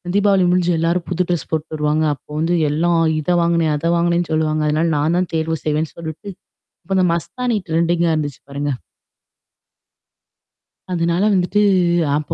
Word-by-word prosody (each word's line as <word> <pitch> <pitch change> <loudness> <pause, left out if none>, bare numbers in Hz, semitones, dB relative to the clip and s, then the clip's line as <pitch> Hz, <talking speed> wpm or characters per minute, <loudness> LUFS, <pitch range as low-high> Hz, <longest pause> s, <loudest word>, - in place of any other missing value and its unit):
தீபாவளி 200 -2 +3
முடிஞ்சு 180 -1 +2
எல்லாரும் 170 +1 0
புது 180 0 -1
ட்ரெஸ் 175 -3 -2
போட்டு 160 0 -2
வருவாங்க. 150 +1 0
அப்போ 140 - -33
வந்து 170 +2 +1
எல்லாம் 165 +3 +1 0.2
இதை 175 +4 0
வாங்குனேன் 170 -2 +1
அதை 165 +3 -2
வாங்குனேன் 170 0 +1
சொல்லுவாங்க. 155 -1 0
அதனால 155 +3 +1
நான் 160 +4 +1
தான் 185 - -1
தேர்வு 160 0 -1
செய்வேன்னு 155 +1 -1
சொல்லிவிட்டு 165 +5 -7 0.5
இப்போ 190 +3 -2
அந்த 185 - +3
மஸ்தானி 215 +8 -2
ட்ரெண்டிங்கா 170 +1 +1
இருந்துச்சு 145 -2 -4
பாருங்க. 140 +1 -2 2.2
அதுனால 170 +2 0
வந்துட்டு 190 +3 +1 0.5
அப்போ 150 0 -3
170 Hz, 145 wpm, -19 LUFS, 155-175 Hz, 2.2 s, தீபாவளி